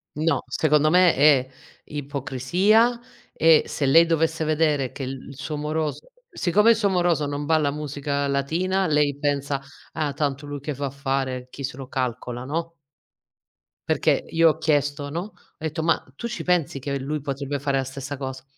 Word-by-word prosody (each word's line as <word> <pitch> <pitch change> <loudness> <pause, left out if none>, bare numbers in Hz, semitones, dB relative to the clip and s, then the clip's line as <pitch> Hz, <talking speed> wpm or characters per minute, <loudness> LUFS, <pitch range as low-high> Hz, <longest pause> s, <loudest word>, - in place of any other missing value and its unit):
No. 155 -2 +1
Secondo 150 -1 +2
me 180 +1 +5
è 140 -2 +5 0.4
ipocrisia 150 - +1 0.3
e 160 -1 +5
se 145 - -2
lei 165 +5 +6
dovesse 165 0 +1
vedere 150 -4 +1
che 135 - -6
l 135 +1 -7
il 135 - -11
suo 150 +2 -4
moroso 155 - -3 0.2
siccome 210 +6 +4
il - - +5
suo 210 -2 +1
moroso 175 -5 +1
non 145 0 -3
balla 150 -2 +2
musica 145 -1 -3
latina 170 +8 0
lei 150 -2 +2
pensa: 145 -1 -1 0.3
"Ah, 155 -2 -1
tanto 140 -1 -2
lui 145 0 -5
che 145 +2 -4
va 140 +1 -3
a - - -3
fare. 135 -2 -2
Chi 140 - -9
se 130 -1 -4
lo 135 -2 -7
calcola." 125 -1 -3
no? 165 +5 -4 1.1
Perché - - +2
io 165 0 +5
ho 155 - -1
chiesto, 145 -2 0
no, 165 +4 -3
ho 205 +3 -9 0.2
detto: 160 0 -3
"Ma 165 0 +2
tu 235 - -4
ci 235 - -5
pensi 175 -6 +1
che 140 +1 -3
lui 150 +3 -3
potrebbe 140 0 -4
fare 140 0 0
la 135 - 0
stessa 135 +2 -6
cosa?" 130 -1 -6
145 Hz, 180 wpm, -24 LUFS, 140-160 Hz, 1.1 s, lei